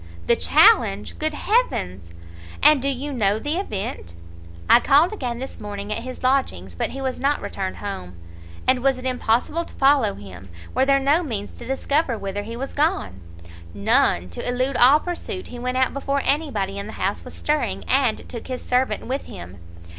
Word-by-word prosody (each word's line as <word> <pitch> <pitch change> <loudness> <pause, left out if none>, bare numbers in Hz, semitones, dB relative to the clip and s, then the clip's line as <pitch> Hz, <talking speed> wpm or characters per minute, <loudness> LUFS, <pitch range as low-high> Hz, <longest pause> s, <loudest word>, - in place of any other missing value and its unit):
"The - - +4
challenge! 100 +1 +4
good 310 -1 -1
heaven! 350 - 0 0.6
and 300 -3 +6
do 275 - 0
you 280 +2 -3
know 210 -4 +2
the 295 +8 -2
event?" 200 - -4 0.5
"I - - +7
called 295 - +4
again 250 - -3
this 265 +2 -7
morning 205 0 -6
at 230 - -4
his 255 +1 -8
lodgings, 255 - 0
but 85 - -2
he 270 - -7
was 265 -1 -3
not 280 +2 +1
returned 190 -1 -4
home." 90 - -6 0.5
"And 260 -1 +4
was 270 0 +2
it 255 - -9
impossible 255 +5 0
to - - -14
follow 270 -7 +3
him? 95 -2 -11 0.2
Were 260 +2 +2
there 275 0 +5
no 280 +5 +3
means 220 - -4
to - - -11
discover 270 -1 0
whither 200 0 -4
he 230 +3 -7
was 270 +2 -5
gone?" 100 - -1 0.5
"None; 90 -3 +2
to 85 - -4
elude 255 +2 0
all 265 +6 +6
pursuit, 370 +3 -5
he 245 - -8
went 250 +1 -2
out 260 -1 +2
before 275 0 -1
any 295 +2 +1
body 195 -4 -3
in 200 - -6
the 220 - -8
house - - -2
was - - -9
stirring, 300 0 -1
and 260 -4 +1
took 235 - -8
his 255 -1 -5
servant 255 +1 0
with 265 +3 -3
him." 90 +2 -10
255 Hz, 190 wpm, -23 LUFS, 205-280 Hz, 0.6 s, I